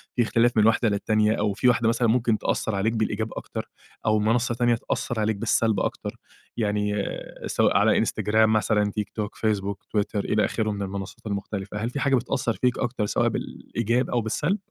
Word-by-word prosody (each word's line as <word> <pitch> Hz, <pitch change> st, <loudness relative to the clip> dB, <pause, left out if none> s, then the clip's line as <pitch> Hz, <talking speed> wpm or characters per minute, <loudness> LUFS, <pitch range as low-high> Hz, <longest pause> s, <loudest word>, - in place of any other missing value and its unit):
في 125 Hz, -, +3 dB
اختلاف 115 Hz, +2 st, +2 dB
من 105 Hz, -, +5 dB
واحدة 115 Hz, 0 st, +3 dB
للتانية، 105 Hz, +1 st, +2 dB
أو 105 Hz, -2 st, 0 dB
في 120 Hz, +5 st, +1 dB
واحدة 120 Hz, -2 st, +3 dB
مثلًا، 115 Hz, +1 st, +2 dB
ممكن 115 Hz, -1 st, +2 dB
تأثِّر 110 Hz, -, -1 dB
عليك 105 Hz, +3 st, +1 dB
بالإيجاب 110 Hz, 0 st, -1 dB
أكتر، -, -, -6 dB, 0.4 s
أو 110 Hz, 0 st, +3 dB
منصة 115 Hz, +3 st, +1 dB
تانية 120 Hz, 0 st, +3 dB
تأثِّر 115 Hz, 0 st, -3 dB
عليك 110 Hz, 0 st, +1 dB
بالسلب 110 Hz, 0 st, +1 dB
أكتر؟ -, -, -3 dB, 0.4 s
يعني، 105 Hz, -2 st, 0 dB, 0.5 s
سواء -, -, +2 dB
على -, -, +4 dB
Instagram 110 Hz, +1 st, +2 dB
مثلًا، 105 Hz, -1 st, +2 dB
TikTok، 105 Hz, 0 st, -3 dB
Facebook، 100 Hz, -2 st, 0 dB, 0.2 s
Twitter، 105 Hz, 0 st, 0 dB
إلى 105 Hz, -1 st, +2 dB
آخره 110 Hz, -2 st, -1 dB
من 100 Hz, -1 st, -4 dB
المنصات 95 Hz, +1 st, -6 dB
المختلفة، 100 Hz, 0 st, -4 dB
هل 110 Hz, +3 st, -2 dB
في 140 Hz, -, -4 dB
حاجة 135 Hz, 0 st, +3 dB
بتأثِّر 125 Hz, -2 st, 0 dB
فيك 125 Hz, +2 st, 0 dB
أكتر، 120 Hz, -3 st, -1 dB
سواء -, -, +1 dB
بالإيجاب 120 Hz, +2 st, -2 dB
أو 120 Hz, -, +1 dB
بالسلب؟ 150 Hz, -, 0 dB
110 Hz, 180 wpm, -25 LUFS, 105-115 Hz, 0.5 s, من